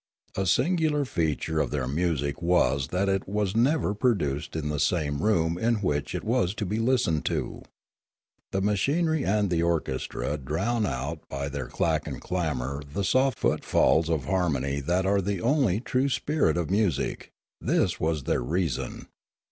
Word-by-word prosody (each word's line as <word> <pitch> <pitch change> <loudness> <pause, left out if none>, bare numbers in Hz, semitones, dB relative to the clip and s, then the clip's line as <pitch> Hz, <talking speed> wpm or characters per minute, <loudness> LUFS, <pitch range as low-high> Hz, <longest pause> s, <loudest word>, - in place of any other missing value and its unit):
A 95 0 -1
singular 150 - +2
feature 80 - -1
of - - +1
their 70 -4 -2
music 75 0 -1
was 70 -6 +2
that 90 +4 0
it 95 -1 0
was 105 -1 -1
never 125 -1 +2
produced 85 - 0
in 75 -2 -2
the 75 -1 -2
same 75 -1 0
room 85 -5 +1
in 115 +3 +2
which 75 -9 -1
it - - -3
was 110 -4 +1
to 105 - -2
be 105 +4 -2
listened 115 -10 +1
to. - - -2 0.9
The 95 - -1
machinery 145 - +1
and 100 -1 +1
the 85 -1 +2
orchestra 75 -3 -1
drown 95 - -1 0.4
by 70 0 -3
their 70 -2 -4
clack - - 0
and - - -5
clamour 75 -6 -2
the 75 +8 -4
soft 130 +3 +2
footfalls 80 +1 +2
of 80 -6 0
harmony 70 -7 0
that 90 +6 0
are 100 +1 +2
the 100 0 -2
only 120 - +2
true 130 +3 0
spirit 140 - +1
of 85 0 -2
music; 100 -3 0 0.3
this - - +1
was 80 -3 0
their - - 0
reason. 80 +1 -2
90 Hz, 160 wpm, -27 LUFS, 75-110 Hz, 0.9 s, singular